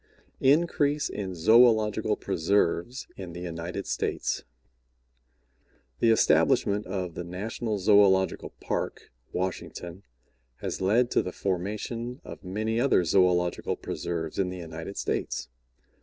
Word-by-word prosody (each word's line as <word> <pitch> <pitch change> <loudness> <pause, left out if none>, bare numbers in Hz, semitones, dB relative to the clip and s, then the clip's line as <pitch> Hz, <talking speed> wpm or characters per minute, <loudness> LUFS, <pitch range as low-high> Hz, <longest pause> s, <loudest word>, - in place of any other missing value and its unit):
INCREASE 145 0 +2
IN 95 -3 -4
ZOOLOGICAL 110 +3 +4
PRESERVES 95 +6 0
IN 90 -3 -7
THE 85 - -7
UNITED 85 +2 -5
STATES - - -2 1.6
The 115 - +4
establishment 105 -2 +3
of 90 -2 -3
the 85 - -5
National 105 +5 -3
Zoological 95 -1 +4
Park, - - -4 0.2
Washington, 90 0 -4 0.5
has - - -5
led 115 +6 +3
to - - +3
the 90 - -5
formation 105 +7 -3
of - - -10
many 110 +5 -1
other 125 -7 +3
zoological 90 0 +2
preserves 80 -1 -4
in 95 -2 +1
the 90 - -6
United 80 +2 -7
States. - - -2
95 Hz, 110 wpm, -27 LUFS, 90-110 Hz, 1.6 s, ZOOLOGICAL